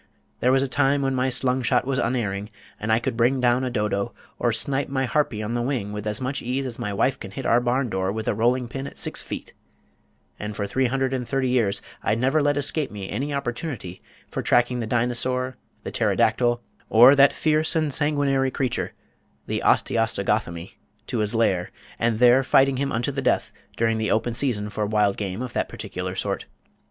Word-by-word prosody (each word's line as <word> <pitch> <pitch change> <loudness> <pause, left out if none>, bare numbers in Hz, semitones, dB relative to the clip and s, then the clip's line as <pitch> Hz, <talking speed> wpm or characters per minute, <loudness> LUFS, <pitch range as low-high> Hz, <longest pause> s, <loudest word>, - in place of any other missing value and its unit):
There 125 - +3
was 135 0 +3
a - - -1
time 140 +1 +2
when 135 0 0
my 130 0 +1
slungshot 125 0 +1
was 135 0 0
unerring, 105 -5 -1 0.3
and 110 +1 -2
I 110 - +5
could 115 - -2
bring 125 +3 +2
down 125 +1 +2
a 130 - -1
Dodo, 105 -4 -1 0.2
or - - +2
snipe 140 0 0
my 135 -1 0
Harpy 125 -6 0
on 110 +2 -3
the 120 - 0
wing 120 -5 -2
with 105 0 -5
as 105 0 0
much 130 +2 -2
ease 130 +3 -2
as 125 -3 -5
my 105 - -3
wife 110 +6 +1
can 95 - -7
hit 125 +7 -7
our 120 +1 +4
barn 125 +2 +1
door 95 -2 -1
with 110 +1 -4
a - - +2
rolling 120 +3 +1
pin 135 +3 -5
at - - -11
six - - -2
feet, - - -7 0.9
and 105 0 -5
for 100 - -2
three 130 +5 +1
hundred 135 +1 -1
and 125 -2 -2
thirty 135 -2 0
years 115 -6 +1 0.2
I - - +1
never 130 +6 +2
let 145 0 +2
escape 145 +1 +1
me 100 -2 -7
any 135 +9 -2
opportunity 120 - -4 0.3
for - - -4
tracking 120 0 +2
the 115 - -3
Dinosaur, 125 +2 0 0.3
the - - -5
Pterodactyl, 120 +2 +1 0.3
or 125 +5 +8
that 140 0 +6
fierce 155 0 +1
and 155 -3 +1
sanguinary 140 -3 +1
creature 130 -2 -2 0.5
the - - -2
Osteostogothemy 100 -6 0 0.3
to 120 - -3
his 105 +1 +1
lair 95 -6 +1 0.3
and 115 -1 +1
there 125 +2 +6
fighting 135 0 +3
him 140 +1 -1
unto 120 +5 -1
the 135 0 -3
death - - +1 0.3
during 115 -1 +1
the 110 - -1
open 115 +2 +1
season 115 -5 -1
for 105 -1 -2
wild 105 -2 +2
game 100 +3 -4
of 125 - -6
that - - -1
particular - - -5
sort. - - -2
120 Hz, 205 wpm, -24 LUFS, 110-135 Hz, 0.9 s, or